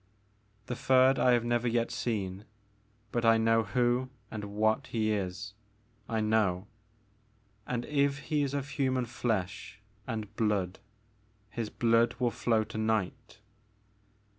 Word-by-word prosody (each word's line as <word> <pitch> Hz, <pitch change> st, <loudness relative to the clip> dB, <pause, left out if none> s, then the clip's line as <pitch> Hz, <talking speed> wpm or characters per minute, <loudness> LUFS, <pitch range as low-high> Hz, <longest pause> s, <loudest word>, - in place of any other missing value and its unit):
"The 125 Hz, -, -4 dB
third 130 Hz, +2 st, +4 dB
I 125 Hz, -, +5 dB
have 120 Hz, -1 st, +2 dB
never 120 Hz, 0 st, +1 dB
yet 115 Hz, 0 st, +1 dB
seen. 100 Hz, -3 st, -3 dB, 0.7 s
But 120 Hz, -, -1 dB
I 115 Hz, 0 st, +6 dB
know 115 Hz, 0 st, +3 dB
who 120 Hz, +4 st, +1 dB, 0.2 s
and 105 Hz, -2 st, -5 dB
what 110 Hz, +5 st, 0 dB
he 110 Hz, -2 st, 0 dB
is, 100 Hz, 0 st, -3 dB, 0.3 s
— 110 Hz, -1 st, -35 dB
I -, -, +1 dB
know; 105 Hz, -4 st, +1 dB, 1.0 s
and 120 Hz, -1 st, -2 dB
if 140 Hz, -1 st, +1 dB
he 150 Hz, +1 st, -1 dB
is 140 Hz, 0 st, -1 dB
of 140 Hz, 0 st, -3 dB
human 130 Hz, -3 st, 0 dB
flesh 105 Hz, -4 st, -3 dB, 0.3 s
and 110 Hz, -4 st, -5 dB
blood, 100 Hz, -5 st, 0 dB, 0.7 s
his 115 Hz, -2 st, -3 dB
blood 115 Hz, +1 st, +2 dB
will 125 Hz, -2 st, +1 dB
flow 115 Hz, -2 st, +1 dB
to 110 Hz, 0 st, -6 dB
night." 110 Hz, +1 st, -2 dB
115 Hz, 140 wpm, -30 LUFS, 105-125 Hz, 1.0 s, I